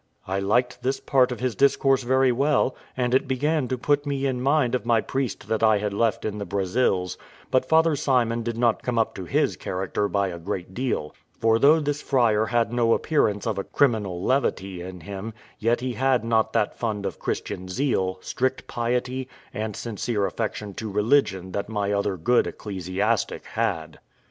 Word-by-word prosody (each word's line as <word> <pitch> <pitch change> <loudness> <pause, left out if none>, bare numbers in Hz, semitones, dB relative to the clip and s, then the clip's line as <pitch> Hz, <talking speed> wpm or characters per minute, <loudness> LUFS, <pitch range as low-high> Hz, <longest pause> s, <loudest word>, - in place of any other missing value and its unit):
I 95 +1 -1
liked 120 +6 +1
this 130 +2 -1
part 130 -2 +3
of 125 - -5
his 130 -2 0
discourse 135 +2 +3
very 130 +1 +3
well, 135 0 +2 0.2
and 125 -1 0
it 130 +1 +3
began 145 +2 0
to 130 - -2
put 145 +3 +1
me 140 -2 -2
in 130 -2 -1
mind 135 -2 +2
of 125 - 0
my 120 -1 +3
priest 130 +3 -3
that 110 -1 0
I 110 -1 +5
had 105 0 -2
left 110 0 0
in 105 -1 -3
the - - -3
Brazils; 95 -1 0 0.3
but 130 0 +3
Father 160 -1 +4
Simon 120 -4 +1
did 115 0 -3
not 120 -1 +2
come 125 -2 -2
up 115 - +1
to 95 - -7
his - - +1
character 95 +2 -2
by 100 -1 0
a 85 -1 -6
great 90 +1 -5
deal; 120 - -2 0.2
for 115 0 +3
though 150 +5 +6
this 145 -1 -2
friar 110 -5 +2
had 115 -1 +1
no 115 -1 +3
appearance 105 -10 +1
of 110 -4 -1
a - - -2
criminal 105 -11 +1
levity 100 -8 0
in 90 0 -8
him, 100 +5 -7 0.2
yet 115 +2 +1
he 125 -1 -2
had 130 -2 +1
not 115 -1 +2
that 105 - +1
fund 105 -4 -2
of - - -4
Christian 95 - -4
zeal, 95 -4 0
strict 130 +1 -2
piety, 125 +2 -2 0.3
and 110 -1 -3
sincere 110 -2 -2
affection 105 +1 -3
to 110 +3 -5
religion 105 -3 +1
that 100 +2 -3
my 105 -2 -1
other 100 -1 0
good 120 +10 +2
ecclesiastic 95 -2 -2
had. - - -2
115 Hz, 190 wpm, -25 LUFS, 100-130 Hz, 0.3 s, though